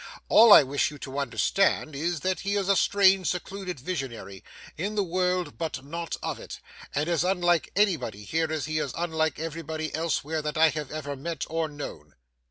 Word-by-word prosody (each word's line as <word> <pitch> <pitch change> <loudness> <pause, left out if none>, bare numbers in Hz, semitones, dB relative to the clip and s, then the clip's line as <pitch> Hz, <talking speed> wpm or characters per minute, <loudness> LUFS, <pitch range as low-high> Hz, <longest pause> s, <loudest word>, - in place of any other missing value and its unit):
All 225 +1 +8
I 155 - +10
wish 140 +1 0
you 150 - -10
to 140 0 -5
understand 140 - +1
is, 165 +2 -2
that 185 0 -1
he 200 0 -1
is 200 -2 0
a 200 - +4
strange, 195 -2 +4
secluded 180 -2 -4
visionary, 120 - -5 0.3
in 200 +6 -3
the 205 - +2
world 180 0 -1
but 155 -5 -4
not 165 +3 -4
of - - -3
it; - - -9 0.4
and 145 +3 0
as 170 -2 +1
unlike 175 -3 +1
anybody 150 - +1
here 160 +8 -1
as 155 -3 -2
he 155 0 -1
is 140 -4 -3
unlike 160 -3 0
anybody 160 0 -4
elsewhere 160 -1 -1
that 150 0 -4
I 160 0 +6
have 150 -2 -4
ever 145 -2 -5
met 160 +2 -4
or 165 0 0
known. 140 - -9
160 Hz, 185 wpm, -27 LUFS, 145-180 Hz, 0.4 s, I